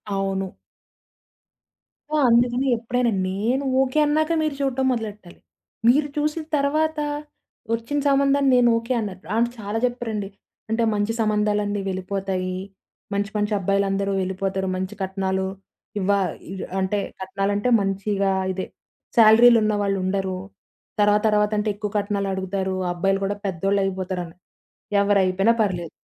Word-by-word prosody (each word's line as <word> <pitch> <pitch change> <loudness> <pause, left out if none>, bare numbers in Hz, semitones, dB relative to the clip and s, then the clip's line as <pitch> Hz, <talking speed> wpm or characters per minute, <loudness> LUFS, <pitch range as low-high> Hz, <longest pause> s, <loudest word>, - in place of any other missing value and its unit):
అవును. 195 -1 -2 1.6
సో, 310 - 0
అందుకని 245 +3 +3
ఎప్పుడైనా 240 +1 0 0.2
నేను 230 +8 0 0.2
ఓకే. 265 +2 +1
అన్నాక 310 +2 +1
మీరు 310 -2 -1
చూడటం 265 -1 0
మొదలెట్టాలి. 210 -6 -5 0.5
మీరు 290 +4 +4
చూసిన 300 +2 -1
తర్వాత 305 +2 +1 0.7
ఒచ్చిన 235 +6 -1
సంబంధాన్ని 275 0 +3
నేను 245 -1 +5
ఓకే 230 +3 -2
అనరు. 200 -4 -4 0.2
అంటే 235 +1 +2
చాలా 210 +1 -3
చెప్పారండి. 225 -5 -3 0.4
అంటే 225 +1 +1
మంచి 205 +2 0
సంబంధాలన్నీ 210 -1 +1
వెళ్ళిపోతాయి. 185 -1 -3 0.6
మంచి, 200 0 -1
మంచి 210 +1 0
అబ్బాయిలందరూ 195 +1 0
వెళ్ళిపోతారు. 190 +1 -2
మంచి 190 +3 -4
కట్నాలు 190 0 -1 0.5
ఇవ్వా 200 +1 +2 0.3
ఇ - - -4 0.3
అంటే 190 +2 0 0.2
కట్నాలంటే 195 +4 -1
మంచిగా 195 0 0 0.2
ఇదే 185 0 -3 0.5
సాలరీలు 230 +1 +8
ఉన్నవాళ్ళువుండరు. 195 -2 0 0.6
తర్వాత, 205 0 +4
తర్వాత 210 0 +2
అంటే 210 +1 0
ఎక్కువ 210 0 -4
కట్నాలడుగుతారు 195 -2 -2 0.2
అబ్బాయిలు 195 +2 +1
కూడా 200 +1 -1
పెద్దోళ్ళు 195 +2 0
అయిపోతారని. 185 -3 -4 0.7
ఎవరైపోయినా 195 +1 +3
పర్లేదు. 175 -6 -2
205 Hz, 115 wpm, -23 LUFS, 195-235 Hz, 1.6 s, సాలరీలు